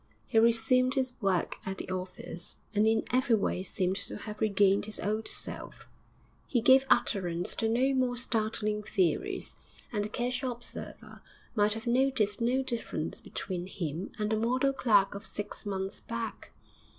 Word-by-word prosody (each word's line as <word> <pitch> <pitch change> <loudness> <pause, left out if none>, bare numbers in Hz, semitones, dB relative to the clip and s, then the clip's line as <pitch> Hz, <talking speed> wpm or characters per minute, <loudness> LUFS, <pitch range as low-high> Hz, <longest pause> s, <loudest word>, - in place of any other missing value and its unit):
He 225 - +3
resumed 235 +3 +4
his 260 -2 +1
work 190 -4 +1
at 190 0 -4
the - - -6
office, 185 -2 -6 0.2
and 210 +1 +3
in 220 0 +3
every 255 -2 +4
way 200 -3 0
seemed 185 0 -1
to - - -6
have 210 +1 -8
regained 200 -2 +3
his 215 -1 -4
old 215 +2 -1
self. - - -4 0.6
He 245 - +2
gave 265 +3 +6
utterance 175 -4 +1
to 225 - +1
no 255 +4 +2
more 255 -2 +1
startling 215 -3 0
theories, 210 - -1 0.4
and 205 -2 0
the 210 - -4
casual 250 +2 -1
observer 240 +1 -6 0.3
might 210 -2 +3
have 225 - -6
noticed 240 -4 +2
no 255 +3 +2
difference 235 -3 -3
between 180 -2 -5
him 170 -1 -4
and 210 -1 -1
the 220 - +2
model 255 +5 +2
clerk 205 -7 +4
of 200 +1 -7
six 205 +1 -5
months 195 -1 -3
back. 230 -1 -5
220 Hz, 160 wpm, -30 LUFS, 200-245 Hz, 0.6 s, gave